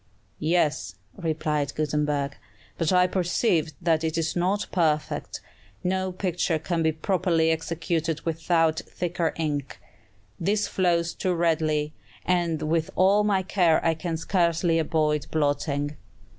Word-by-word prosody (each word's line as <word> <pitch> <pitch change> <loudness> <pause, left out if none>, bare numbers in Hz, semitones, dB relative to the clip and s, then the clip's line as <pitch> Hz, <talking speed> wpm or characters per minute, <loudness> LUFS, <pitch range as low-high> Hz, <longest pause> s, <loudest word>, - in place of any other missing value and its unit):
"Yes," 155 - 0 0.2
replied 150 -3 -1
Gutenberg, 150 -2 -1 0.4
"but 165 0 0
I 180 0 +5
perceive 180 -3 +1
that 165 -2 +1
it 160 0 -1
is 160 -1 -1
not 185 +4 +1
perfect. 155 -4 0 0.4
No 185 +1 0
picture 180 -3 -1
can 165 +2 -2
be 160 0 +3
properly 165 -1 +1
executed 160 0 -2
without 165 -1 +1
thicker 175 -1 -2
ink. 145 -4 -3 0.6
This 205 +4 +1
flows 170 -2 +1
too 185 -1 -1
readily, 155 -3 +1 0.3
and 170 -3 +1
with 160 +1 0
all 195 +3 +4
my 200 -2 +2
care 180 -4 +3
I 165 - +4
can 165 0 -3
scarcely 170 -1 +1
avoid 155 -2 0
blotting." 145 -1 -1
165 Hz, 125 wpm, -26 LUFS, 155-180 Hz, 0.6 s, I